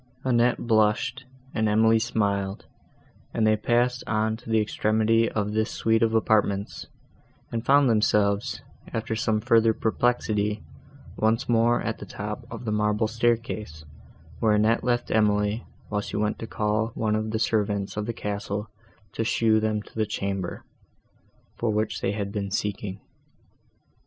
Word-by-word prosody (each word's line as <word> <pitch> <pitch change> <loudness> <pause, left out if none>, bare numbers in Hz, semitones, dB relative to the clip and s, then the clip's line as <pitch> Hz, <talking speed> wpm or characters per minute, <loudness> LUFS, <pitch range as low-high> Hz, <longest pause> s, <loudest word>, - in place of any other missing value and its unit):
Annette 120 -1 +3
blushed, 115 +3 +2 0.3
and 110 -1 +1
Emily 110 +1 +4
smiled, 100 -4 -1 0.7
and 110 - +2
they 110 0 +4
passed 120 +3 +1
on 110 0 +1
to 115 0 -13
the 110 0 +3
extremity 110 +1 +2
of 105 -1 -2
this 110 0 +1
suite 115 0 +1
of 115 0 +2
apartments, 105 -2 +1 0.6
and 115 -1 -2
found 140 +2 +5
themselves, 105 0 +1 0.3
after 110 -1 -2
some 110 -2 +1
further 115 0 +3
perplexity, 110 -3 0 0.5
once 110 +2 +1
more 120 0 +3
at - - -3
the - - -8
top - - -6
of - - -8
the 110 - -1
marble 105 +1 +1
staircase, 115 -8 -1 0.5
where 110 -2 +3
Annette 110 +2 +2
left 120 -1 0
Emily, 105 0 +1 0.2
while 105 -1 -1
she - - -5
went 105 0 -1
to 115 - -5
call 105 +1 0
one 110 -1 0
of 110 0 -2
the 110 - -1
servants 105 -3 0
of 105 0 -3
the - - 0
castle 105 -1 -4 0.4
to 115 - -1
show 110 -1 +3
them 110 -1 -1
to - - -18
the 110 -1 -1
chamber, 100 -3 -3 1.0
for 115 - 0
which 105 0 -1
they 100 - 0
had 100 -1 -3
been 100 -1 -3
seeking. 100 -1 -3
110 Hz, 150 wpm, -26 LUFS, 105-115 Hz, 1.0 s, found